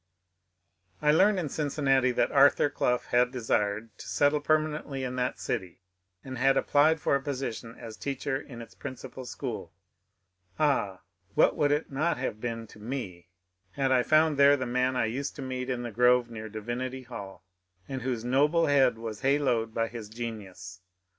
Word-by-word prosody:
I 150 - +3
learned 200 +6 +4
in 165 - -2
Cincinnati 140 -3 +1
that - - +1
Arthur 140 +1 +5
Clough 125 -3 +1
had 125 0 +3
desired 110 -3 -1
to - - -9
settle 145 +1 +2
permanently 150 -3 0
in 125 -1 -3
that 125 0 -1
city, 90 0 -4 0.4
and 130 -2 -7
had 135 +1 +4
applied 155 +3 +3
for 140 - +2
a 140 - 0
position 130 -4 -4
as 110 -2 -9
teacher 135 0 -3
in 120 -4 -9
its 115 - -15
principal 130 -1 -8
school. - - -6 0.8
Ah, 135 -11 +1 0.3
what - - +4
would 145 -1 +2
it 150 +1 0
not 150 +3 0
have 115 -4 -4
been 115 -2 -4
to 105 - -16
me 105 -7 -6 0.5
had 135 -1 0
I 130 -1 +5
found 155 +2 +3
there 140 0 +6
the 130 - -3
man 125 +1 0
I 120 - +2
used 135 +6 -3
to 140 - -6
meet 130 0 -4
in 125 -1 -2
the 120 - -5
grove 125 +1 +3
near 110 -1 -7
Divinity 120 +4 -4
Hall, 100 -7 -9 0.4
and 135 -1 -4
whose 120 -2 -3
noble 150 +6 +3
head 135 -5 +3
was 110 -2 -6
haloed 135 -5 +1
by 115 0 0
his 115 -2 -8
genius 100 -5 -7
130 Hz, 175 wpm, -28 LUFS, 115-140 Hz, 0.8 s, there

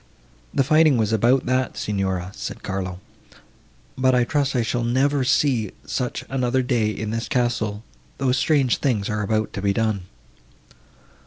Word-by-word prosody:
"The 135 - +2
fighting 155 -1 +4
was 110 -1 +1
about 120 +5 +3
that, 130 +1 0
Signora," 95 -3 -2
said - - -7
Carlo; 95 -2 -4 1.0
"but 130 0 +3
I 125 - +4
trust 140 +1 0
I 120 - +2
shall 120 +1 -1
never 135 +4 +2
see 125 -5 +1
such 125 -2 -3
another 130 0 0
day 120 -4 +1
in 110 0 -4
this 115 +1 -3
castle, 115 -4 -1 0.3
though 135 -1 +1
strange 135 -1 +2
things 115 -8 0
are 105 0 -1
about 110 +1 -1
to 100 - -4
be 100 0 +1
done." 110 -4 -1
120 Hz, 155 wpm, -23 LUFS, 105-130 Hz, 1.0 s, fighting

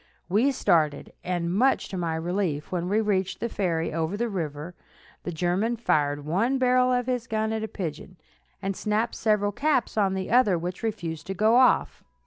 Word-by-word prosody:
We 220 +10 +3
started, 160 - +1
and, 175 -1 -2
much 255 +7 +2
to - - -6
my 170 -3 -1
relief, 165 -2 -2
when 180 -1 -2
we 210 +2 +2
reached 195 -3 -1
the 235 - -2
ferry 165 -7 -1
over 165 +4 -2
the 235 +1 -1
river, 160 -3 -4 0.5
the 175 - -5
German 180 +8 0
fired 145 -9 0
one 215 - +1
barrel 255 0 +3
of 245 -1 +1
his 250 -2 -2
gun 220 0 -1
at 220 - -2
a 220 - -3
pigeon, 180 -2 -6 0.5
and 195 0 -2
snapped 215 +3 -1
several 210 -2 +1
caps 275 -1 0
on 195 -2 +2
the 190 -1 -4
other, 225 -7 +4
which 175 +2 -5
refused 165 -8 -4
to 195 - -3
go 215 +4 +3
off. 255 0 +3
195 Hz, 185 wpm, -26 LUFS, 170-225 Hz, 0.5 s, other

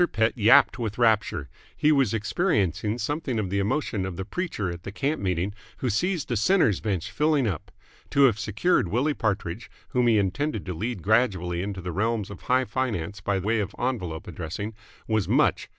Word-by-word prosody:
Pett 110 +1 +2
yapped 115 +2 +5
with 110 -3 -3
rapture. 110 - +2 0.3
He 150 - +4
was 135 -8 +3
experiencing 105 - 0
something 145 -1 -2
of 100 -4 -2
the 100 - +1
emotion 105 -1 -1
of 95 -2 -4
the 95 +1 -5
preacher 135 - -3
at 85 0 -7
the 100 - -7
camp 145 +9 -1
meeting 95 +1 -1 0.2
who 125 - -1
sees 170 - 0
the 120 - -2
Sinners' 115 - +3
Bench 100 -2 -2
filling 150 +3 +2
up. 90 -8 -4 0.4
To 140 - +4
have 115 -6 +4
secured 105 - +1
Willie 125 - +1
Partridge, 105 -3 -2 0.2
whom 125 -1 +2
he 115 -2 +5
intended 105 +4 -1
to 90 - -3
lead 105 +3 -4
gradually 95 -6 +1
into 95 -1 -4
the 90 0 -4
realms 105 +2 -1
of 100 - -9
high 130 +1 +2
finance 105 -8 -3
by 95 +1 0
way 110 +4 0
of 100 0 -3
envelope 95 -11 -3
addressing, 100 +6 -5 0.3
was 110 -3 +1
much. - - +2
110 Hz, 185 wpm, -26 LUFS, 95-125 Hz, 0.4 s, yapped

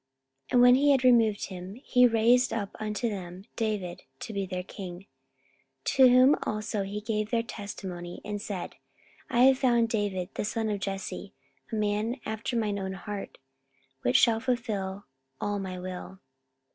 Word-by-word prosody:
44:013:022 - - -16
And 245 - +6
when 245 0 +8
he 290 - +4
had 265 -2 +2
removed 230 -5 +4
him, 185 +1 -8
he 250 0 +4
raised 235 +2 +4
up 205 -3 -3
unto 215 +2 -2
them 185 -3 -6
David 210 -6 -2 0.2
to 220 - -6
be 200 -1 -2
their 180 -1 -4
king; 185 -1 -8 0.8
to 260 -1 +6
whom 255 +4 +6
also 215 0 -2
he 200 +2 -4
gave 215 -1 -2
their 230 -1 +1
testimony, 190 -5 -7
and 205 -1 -4
said, 200 -5 -5 0.5
I 240 - +2
have 265 +1 +6
found 235 -3 +3
David 205 -5 -1
the - - -2
son 220 +1 -1
of 205 -1 -1
Jesse, 195 +1 -5 0.4
a - - -2
man 215 +4 0
after 220 +2 -3
mine 210 -3 0
own 190 0 -3
heart, 205 +1 -6 0.6
which 120 - +1
shall 225 -1 +4
fulfil 210 -6 -2 0.3
all 205 0 -1
my 185 -1 -5
will. 185 +1 -7
210 Hz, 165 wpm, -28 LUFS, 195-230 Hz, 0.8 s, when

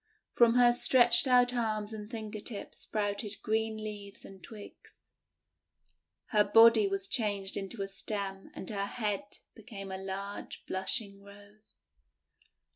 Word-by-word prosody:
From 235 -1 +5
her 245 -1 +6
stretched 240 +1 +4
out 250 -1 +4
arms 220 -3 -2
and 210 -1 -8
finger 220 -2 -6
tips 205 -1 -6
sprouted 205 0 -3
green 220 0 -1
leaves 210 -2 -8
and 190 -1 -13
twigs. 210 0 -13 1.3
Her 210 -2 +4
body 225 0 +6
was 195 0 -2
changed 205 -5 0
into 200 +1 -3
a - - -4
stem 195 -1 -5
and - - -8
her 200 -1 -2
head 205 -3 -3 0.2
became 200 -3 -9
a 190 - -5
large 195 +1 -6
blushing 200 +1 -2
Rose. 205 +1 -17
210 Hz, 130 wpm, -31 LUFS, 200-225 Hz, 1.3 s, her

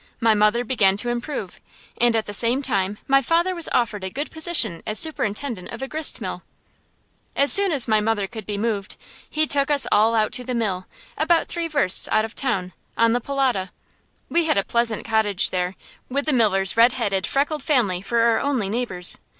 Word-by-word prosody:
My 230 -2 +3
mother 210 +3 +2
began 200 -6 +2
to 240 +4 -2
improve, 240 - -5 0.3
and 240 -1 +3
at 220 - 0
the 205 - -7
same 240 +6 +2
time 200 -5 -1
my 275 0 +4
father 335 +7 +1
was 340 -2 0
offered 215 -5 -1
a 190 - -3
good 285 +10 -5
position 320 - 0
as 215 - -2
superintendent 235 - -1
of 230 +3 -7
a - - -4
gristmill. 310 +2 -2 0.9
As 280 +1 +4
soon 395 -2 +4
as 275 -6 +1
my 215 -1 +2
mother 210 -2 0
could 220 +1 -9
be 205 -1 -3
moved, 210 -2 -3 0.3
he 310 +1 +1
took 285 -1 0
us 285 -2 +4
all 220 +2 +3
out 215 -1 +1
to 250 +2 -1
the 250 0 -4
mill, 195 -6 -2 0.3
about 325 +2 +2
three 340 -1 -2
versts 285 - +2
out 215 0 +2
of 225 - -10
town, 195 -9 -3 0.2
on 230 0 +3
the 245 - 0
Polota. 255 -8 -1 0.6
We 340 0 +1
had 315 - +1
a 200 - +2
pleasant 235 -2 -1
cottage 220 -4 0
there, 180 0 -2 0.3
with 280 +2 -1
the 305 - +1
miller's 195 -6 +2
red 235 +2 +5
headed, 195 -7 -1
freckled 290 +2 -1
family 230 - +1
for 230 +4 0
our 230 -1 +3
only 260 -9 -1
neighbors. 200 -6 +1
230 Hz, 200 wpm, -22 LUFS, 205-275 Hz, 0.9 s, red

